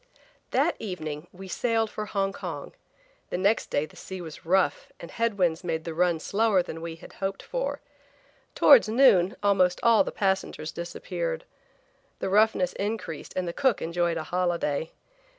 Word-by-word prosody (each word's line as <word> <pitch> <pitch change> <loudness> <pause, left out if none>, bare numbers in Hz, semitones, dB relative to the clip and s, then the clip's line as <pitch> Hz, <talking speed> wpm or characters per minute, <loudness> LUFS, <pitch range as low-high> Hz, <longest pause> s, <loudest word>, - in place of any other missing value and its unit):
THAT - - +2
evening 160 -6 -5
we 190 +1 -10
sailed 225 +3 0
for 210 0 -5
Hong 195 -1 -1
Kong. - - -6 0.6
The - - -2
next 200 +4 +1
day 145 - 0
the 155 - -18
sea 190 0 -8
was 165 -2 -9
rough 190 +1 +1
and 170 - -9
head 230 -3 -1
winds 175 -2 +1
made 160 -2 -2
the 165 - -5
run 175 0 +2
slower 205 0 +2
than 165 -1 -7
we 165 -1 -5
had 165 - -14
hoped 195 0 -2
for. - - -3 0.7
Towards 475 - +7
noon 215 -7 +5
almost 185 -3 +3
all 230 -2 +6
the - - -5
passengers 190 -5 -1
disappeared. 480 - -4 0.7
The - - -3
roughness 200 -3 +3
increased 205 -7 -4
and 185 -1 -1
the 170 - -3
cook 260 -1 +2
enjoyed 170 0 0
a 160 - -3
holiday. 170 -3 -1
185 Hz, 165 wpm, -27 LUFS, 170-210 Hz, 0.7 s, Towards